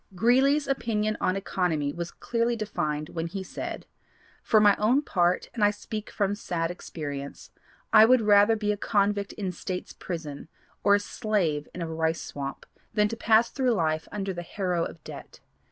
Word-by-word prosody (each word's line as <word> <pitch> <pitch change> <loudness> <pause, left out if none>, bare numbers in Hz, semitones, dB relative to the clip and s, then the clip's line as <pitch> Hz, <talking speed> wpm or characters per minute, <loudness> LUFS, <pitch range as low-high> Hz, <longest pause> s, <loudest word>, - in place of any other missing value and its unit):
Greeley's 265 +8 +3
opinion 215 -5 0
on 185 - +1
economy 170 -7 -1
was 170 +1 -4
clearly 235 0 -1
defined 155 -8 -3
when 165 0 -3
he 190 +3 -5
said: - - -6 0.6
"For 220 - +4
my 205 -1 +6
own 245 +7 +3
part, 180 -7 +1
and 230 -4 -1
I 205 - +6
speak 210 +1 -6
from 200 -1 0
sad 170 -5 -2
experience, 145 -5 -7 0.4
I 215 0 +9
would 255 +1 +5
rather 205 +1 +5
be 210 -1 0
a 205 - -2
convict 200 -1 +1
in 195 -4 -3
States 180 +1 -5
Prison 155 -5 -6 0.4
or 200 0 +6
a - - +2
slave 200 -9 -1
in 175 - -5
a - - -3
rice 160 0 -1
swamp, 140 -1 -6 0.3
than 210 0 +3
to 230 - -4
pass 225 0 +3
through 255 -3 +1
life 155 -5 0
under 195 -2 -3
the 175 - -5
harrow 180 -1 -1
of 165 - -9
debt. - - -10
200 Hz, 175 wpm, -27 LUFS, 170-215 Hz, 0.6 s, I